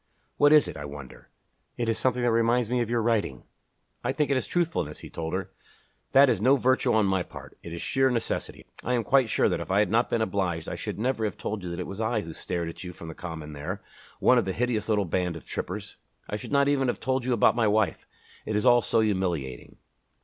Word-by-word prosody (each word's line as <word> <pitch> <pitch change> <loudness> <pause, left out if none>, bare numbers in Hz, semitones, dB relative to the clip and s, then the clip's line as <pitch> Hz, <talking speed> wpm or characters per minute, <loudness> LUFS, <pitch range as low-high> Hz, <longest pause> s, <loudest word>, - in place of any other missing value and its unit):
What 145 0 +5
is 150 -2 +6
it, - - -6
I 75 - -6
wonder? 70 -2 -10 0.5
It 120 -1 -1
is 115 - +2
something 125 -1 +1
which 120 - +3
reminds 115 +1 +2
me 125 -1 +2
of 115 - -2
your 120 -1 +1
writing." 105 - 0 0.6
"I - - +1
think 150 -2 0
that - - +3
it - - +2
is - - -7
truthfulness," 160 - -1
he - - -10
told 80 +1 -3
her. 95 0 -4 0.6
"That 140 +1 +7
is 115 -6 +1
no 130 +5 +5
virtue 130 -1 +2
on 110 -2 +3
my 95 -1 +1
part. - - -10
It 85 - -9
is 85 - -5
sheer 135 0 +2
necessity. 120 -3 -3 0.2
I 125 - 0
am 120 - 0
quite 135 -2 +3
sure - - +3
that - - 0
if - - -6
I 95 - +2
had 105 -2 +3
not 115 +2 +2
been 115 - +1
obliged 90 -5 -2
I - - -4
should - - -5
never 120 +1 -1
have 105 - -3
told 105 -1 -4
you 90 - -4
that 85 - -5
it - - -3
was 100 +3 -6
I 110 0 0
who 80 -3 -8
stared 85 +1 -3
at 85 - -7
you 90 -1 -7
from 80 -1 -9
the - - -6
Common 80 -3 -7
there, 90 +7 -5 0.4
one 125 - +5
of 105 - -2
a 95 - -1
hideous 115 -2 -1
little 105 -2 +2
band 90 0 -1
of 80 - -10
trippers. 100 +2 -5 0.3
I - - -3
should 105 - -7
not 140 0 +4
even 140 -2 +2
have 120 - -1
told 130 0 0
you 125 0 0
about 115 - +4
my 115 -2 +2
wife. 105 -1 +1 0.4
It 110 - -3
is 105 - +1
all 120 -1 +6
so 110 +1 +2
humiliating." 90 - -2
110 Hz, 255 wpm, -27 LUFS, 90-125 Hz, 0.6 s, That